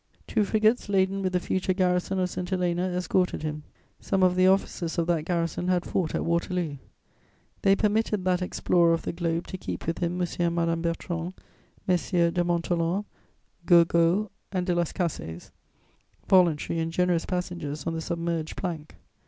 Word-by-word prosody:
Two 215 - +1
frigates 215 +2 +2
laden 195 0 +2
with 185 -1 0
the 180 - +2
future 185 +1 -1
garrison 180 0 +1
of 185 -1 +1
St. 180 -1 -4
Helena 180 -1 0
escorted 180 -1 0
him. 150 -1 -3 0.4
Some 190 -1 0
of 180 -1 +4
the 185 0 +4
officers 185 -3 +1
of 170 - +2
that 165 -3 0
garrison 170 0 -1
had 180 -1 +1
fought 170 -4 -1
at - - -1
Waterloo. 170 -2 -1 0.8
They 195 0 +5
permitted 210 -2 0
that 180 -1 +2
explorer 175 -1 +2
of 165 - -6
the - - -2
globe 170 -1 -1
to 185 - -7
keep - - -5
with 165 - -2
him 175 +1 -1
M. 180 - +1
and 170 -1 +1
Madame 165 -1 0
Bertrand, 170 +1 -3 0.5
Messieurs 175 -2 +2
de 175 0 +1
Montholon, 175 +2 0 0.6
Gourgaud 170 +3 +4 0.2
and 185 -2 -1
de 180 - +1
Las 175 -2 0
Cases, 90 - -4 0.8
voluntary 170 -3 +3
and 165 0 -1
generous 175 -1 +1
passengers 175 -5 -4
on 165 - -1
the 165 - -3
submerged 170 -1 -3
plank. 165 -5 -5
175 Hz, 170 wpm, -27 LUFS, 170-185 Hz, 0.8 s, They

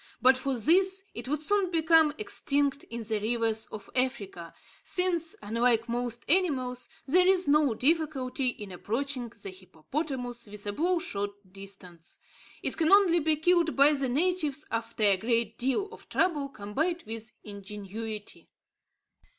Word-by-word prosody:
But 260 +1 +6
for 260 0 -2
this, 380 - +3
it 235 +2 -6
would 300 +2 -1
soon 400 +2 +1
become 325 -2 +4
extinct 280 +6 0
in 235 0 -6
the 220 -1 -1
rivers 225 0 +1
of 210 - -9
Africa, 200 -10 -2 0.3
since, 345 -3 0
unlike 230 +2 +1
most 240 0 -3
animals, 265 -8 +1 0.2
there 360 +6 +4
is 375 -3 +3
no 285 -4 +3
difficulty 275 -2 0
in 210 -5 -4
approaching 245 +6 -3
the 195 - -5
hippopotamus 240 - -5
within 205 0 -5
bow 350 - +1
shot 205 -10 -2 0.2
distance. 195 -4 -9 0.5
It - - -2
can 320 0 +2
only 385 -4 +6
be 315 0 +2
killed 335 +1 +2
by 280 +2 +6
the 275 -3 -1
natives 305 0 0
after 225 -1 -3
a 200 -2 +5
great 230 +1 0
deal 270 +11 0
of - - -14
trouble 295 -7 +1
combined 300 - -2
with 225 0 -6
ingenuity. 210 +1 -7
255 Hz, 140 wpm, -28 LUFS, 220-315 Hz, 0.5 s, But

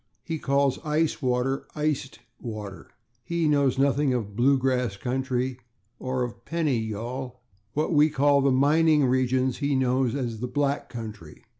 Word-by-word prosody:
He 160 -1 -4
calls 140 -1 +1
ice 155 0 0
water 130 +1 0
/iced 150 -3 -2 0.2
water/. 105 -5 -7 0.3
He 170 +4 0
knows 140 -3 +2
nothing 140 -1 +2
of 105 -4 -4
/blue 135 +4 +4
grass/ 125 -5 0
country 130 +1 -2 0.4
or 130 0 -2
of 120 -1 -6
/pennyr'yal/. 125 -4 -2 0.4
What 155 +3 0
we 150 +1 +5
call 140 0 +3
the 135 - +3
/mining 150 +2 +4
regions/ 130 0 +1
he 140 -1 0
knows 130 -1 +1
as 120 -5 -3
the 125 +2 -4
/black 140 +1 -1
country 105 -10 -9
130 Hz, 145 wpm, -26 LUFS, 125-145 Hz, 0.4 s, we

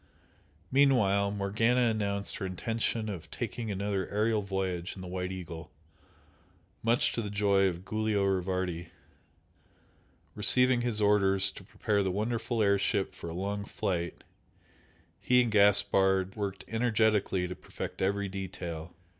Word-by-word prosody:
Meanwhile 115 -8 +4
Morgana 105 +5 +1
announced 100 -2 -2
her 95 - -4
intention 110 +4 -2
of 90 -7 -6
taking 115 -2 -4
another 100 -1 -2
aerial 105 +1 +1
voyage 95 -2 -3
in 95 - -9
the - - -7
"White 90 +1 -3
Eagle" 85 -3 -7 1.1
much 115 +2 +2
to 115 - -1
the 105 - -4
joy 100 -1 +3
of 90 0 -4
Giulio 110 -1 0
Rivardi. 90 -3 -1 1.5
Receiving 125 +3 +3
his 120 -3 -1
orders 100 -2 +3
to 95 - -12
prepare 105 +2 -1
the 95 - 0
wonderful 115 +3 -1
air 100 -1 +3
ship 95 0 0
for 85 - -7
a - - -5
long 100 +2 -2
flight, 85 -4 -3 1.0
he 125 0 +4
and 120 - -2
Gaspard 95 -2 +3
worked 100 -3 -4
energetically 110 -5 +1
to 90 - -6
perfect - - -7
every 100 +1 +1
detail. 90 -4 -6
100 Hz, 135 wpm, -30 LUFS, 95-110 Hz, 1.5 s, Meanwhile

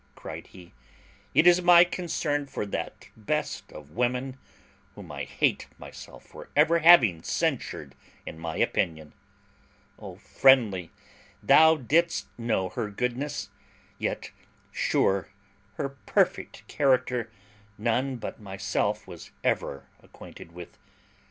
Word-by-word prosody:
cried - - -9
he, 90 -2 -15 0.6
"it 160 - +5
is 175 0 +6
my 175 -1 +8
concern 165 -5 -2
for 135 - -4
that 85 -5 -6
best 110 -2 -3
of 75 -1 -12
women, 125 +5 -1 0.6
whom - - -11
I - - -5
hate - - 0
myself - - -12
for - - -13
having 165 - +6
ever 80 - -18
censured 70 -2 -2 0.3
in 80 - -8
my 80 -1 -5
opinion. 80 -3 -1 0.9
O - - -9
Friendly! 110 -10 +3 0.5
thou 160 0 +6
didst 165 +6 +1
know 110 -6 -1
her 105 - -4
goodness; 125 +7 -3 0.5
yet, - - -3 0.4
sure, 95 0 0 0.5
her 140 - -3 0.2
perfect - - 0
character 130 -4 +1 0.5
none 125 +5 0
but 120 - -7
myself 100 +1 -2
was - - -11
ever 70 - -1 0.2
acquainted 85 - -13
with. 85 0 -12
120 Hz, 115 wpm, -27 LUFS, 95-145 Hz, 0.9 s, my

